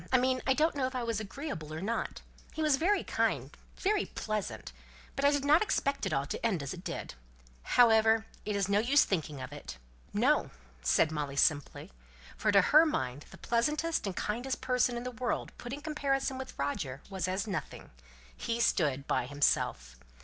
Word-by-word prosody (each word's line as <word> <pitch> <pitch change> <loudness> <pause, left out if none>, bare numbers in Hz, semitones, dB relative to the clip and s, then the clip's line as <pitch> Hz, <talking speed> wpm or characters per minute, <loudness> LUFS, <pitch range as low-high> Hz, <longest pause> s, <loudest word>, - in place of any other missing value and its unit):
"I 260 - +6
mean 255 0 +1
I 265 - +4
don't 315 +3 +2
know 270 -3 0
if 260 - -7
I 250 - -1
was 230 -2 -1
agreeable 215 - -6
or 155 - -4
not. 220 +6 -3 0.3
He 315 - -2
was 300 -3 +4
very 390 +8 +2
kind - - -1 0.2
very 405 0 +1
pleasant 215 - -4 0.4
but 275 - -2
I 285 - +6
did 285 -1 0
not 300 +3 +6
expect 280 -9 0
it - - -3
all 135 - 0
to - - -5
end 195 -10 +1
as 140 - -4
it 180 - -9
did. - - -5 0.5
However, 225 - +4 0.2
it's 200 -2 0
of - - -8
no 200 - +4
use 265 +6 +4
thinking 155 -6 -2
of - - -7
it." 60 - -8 0.3
"No!" - - +2 0.3
said 65 - +3
Molly, 145 -3 -3
simply; 145 0 +1 0.4
for 210 0 +1
to 200 -1 +7
her 305 - +7
mind 135 - -2
the - - -13
pleasantest 300 +4 0
and 190 - -3
kindest 245 +5 -2
person 250 -1 +1
in 240 - -4
the 250 - -4
world 245 0 -3
put 240 - -7
in 285 +2 -5
comparison 275 -3 -1
with 265 - -8
Roger 140 -1 -3
was 190 -2 -2
as 190 +3 -1
nothing; 200 -3 -5 0.4
he 230 0 -3
stood 145 - +1
by 125 - 0
himself. 145 - 0
230 Hz, 195 wpm, -31 LUFS, 165-270 Hz, 0.5 s, to